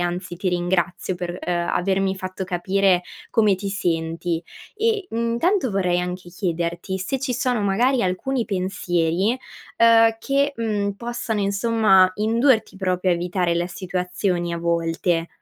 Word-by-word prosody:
anzi 175 Hz, 0 st, -3 dB
ti 185 Hz, +2 st, -1 dB
ringrazio 175 Hz, +1 st, 0 dB
per, 175 Hz, 0 st, -5 dB
uhm, 180 Hz, -, 0 dB, 0.2 s
avermi 190 Hz, +1 st, +1 dB
fatto 185 Hz, 0 st, -5 dB
capire 185 Hz, 0 st, +2 dB, 0.3 s
come 215 Hz, -3 st, +4 dB
ti 200 Hz, +2 st, -5 dB
senti; 165 Hz, -3 st, -1 dB, 0.3 s
eh, 435 Hz, -3 st, 0 dB
mhmm, 230 Hz, +1 st, -1 dB
tanto 355 Hz, -, +2 dB
vorrei 180 Hz, -3 st, +1 dB
anche 180 Hz, 0 st, -5 dB
chiederti, 175 Hz, +1 st, -3 dB
se 230 Hz, +8 st, -3 dB
ci 270 Hz, -1 st, -1 dB
sono 250 Hz, -2 st, 0 dB
magari 235 Hz, +6 st, +2 dB
alcuni 230 Hz, +8 st, -1 dB
pensieri, 185 Hz, +2 st, 0 dB, 0.4 s
uhm, 225 Hz, -1 st, +6 dB
che, 280 Hz, +3 st, +1 dB
uhm, 210 Hz, -3 st, -1 dB
possano 235 Hz, -2 st, -3 dB
insomma 200 Hz, -2 st, +4 dB
indurti 225 Hz, +1 st, +2 dB
proprio 185 Hz, -1 st, 0 dB
a -, -, +3 dB
evitare 175 Hz, 0 st, 0 dB
la 170 Hz, +1 st, 0 dB
situazioni 180 Hz, -1 st, -2 dB
a 170 Hz, -, -2 dB
volte. 170 Hz, 0 st, 0 dB
190 Hz, 140 wpm, -22 LUFS, 175-225 Hz, 0.4 s, uhm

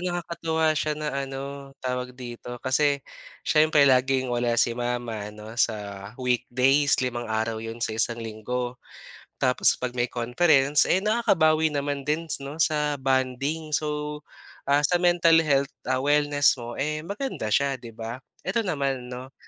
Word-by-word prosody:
nakakatuwa 165 Hz, -3 st, -1 dB
siya 150 Hz, +1 st, -1 dB
na 155 Hz, 0 st, -3 dB
ano 140 Hz, 0 st, -5 dB, 0.2 s
tawag 125 Hz, 0 st, -3 dB
dito, 125 Hz, -1 st, -8 dB
kasi 140 Hz, +1 st, +2 dB, 0.4 s
siyempre 155 Hz, -2 st, +4 dB
laging 130 Hz, -1 st, +3 dB
wala 120 Hz, -1 st, 0 dB
si 120 Hz, -, +3 dB
mama 120 Hz, -3 st, -3 dB
ano 105 Hz, +1 st, -10 dB
sa 110 Hz, -2 st, +2 dB, 0.4 s
weekdays 130 Hz, +3 st, +2 dB
limang 120 Hz, -2 st, -3 dB
araw 110 Hz, 0 st, -1 dB
'yon 115 Hz, +1 st, -4 dB
sa 110 Hz, -, -2 dB
isang 115 Hz, +1 st, 0 dB
linggo. 120 Hz, +2 st, -4 dB, 0.6 s
Tapos 125 Hz, -1 st, +4 dB
'pag 125 Hz, -1 st, -4 dB
may 120 Hz, -, +2 dB
conference, 135 Hz, +4 st, +3 dB
eh, 185 Hz, -, +2 dB
nakakabawi 160 Hz, -9 st, +2 dB
naman 140 Hz, -1 st, -2 dB
dins, 155 Hz, +1 st, 0 dB
'no, 140 Hz, +4 st, -2 dB
sa 150 Hz, -2 st, +1 dB
bonding. 135 Hz, +3 st, -1 dB
So, 150 Hz, 0 st, -2 dB, 0.5 s
ah, 145 Hz, +1 st, +4 dB
sa 175 Hz, +2 st, +1 dB
mental 170 Hz, -2 st, +5 dB
health, 140 Hz, -2 st, +1 dB, 0.2 s
ah, 130 Hz, -, +2 dB
wellness 145 Hz, +1 st, +3 dB
mo, 120 Hz, -2 st, -8 dB
eh, 155 Hz, +2 st, -2 dB
maganda 200 Hz, -, -4 dB
siya, 140 Hz, +5 st, +2 dB
'di 120 Hz, -2 st, -9 dB
ba? 115 Hz, +3 st, -7 dB, 0.2 s
Ito, 230 Hz, -, +1 dB
naman, 135 Hz, -, -2 dB
'no, 130 Hz, +2 st, -8 dB
135 Hz, 150 wpm, -25 LUFS, 125-150 Hz, 0.6 s, mental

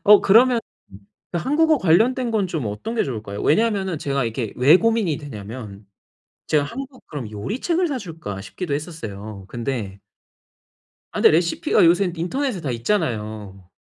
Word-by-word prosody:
어 210 Hz, 0 st, +8 dB
그러면 235 Hz, +4 st, +5 dB, 0.7 s
그 175 Hz, -, 0 dB
한국어 305 Hz, -, +3 dB
관련된 230 Hz, +8 st, +3 dB
건 210 Hz, -4 st, +1 dB
좀 160 Hz, -9 st, -3 dB
어떤 105 Hz, -, -4 dB
게 230 Hz, -, +1 dB
좋을까요? 105 Hz, -5 st, -5 dB
왜냐하면은 190 Hz, -2 st, +1 dB
제가 140 Hz, -3 st, -1 dB
이렇게 115 Hz, -1 st, -3 dB
왜 140 Hz, +7 st, +7 dB
고민이 220 Hz, -7 st, +1 dB
되냐하면, 105 Hz, -6 st, -9 dB, 0.6 s
제가 150 Hz, -2 st, +3 dB
'한국 260 Hz, -, -8 dB
그럼 130 Hz, -8 st, -6 dB
요리책을 265 Hz, -, -1 dB
사 275 Hz, -4 st, -2 dB
줄까?' 160 Hz, -, -7 dB
싶기도 140 Hz, -, -5 dB
했었어요. 110 Hz, -, -6 dB
근데 115 Hz, -5 st, -4 dB, 1.1 s
아 -, -, -4 dB
근데 -, -, +7 dB
레시피가 170 Hz, +2 st, +2 dB
요새는 175 Hz, +1 st, +3 dB
인터넷에 215 Hz, -, -2 dB
다 140 Hz, -, -3 dB
있잖아요. 110 Hz, -, -2 dB
160 Hz, 345 characters per minute, -22 LUFS, -, 1.1 s, 어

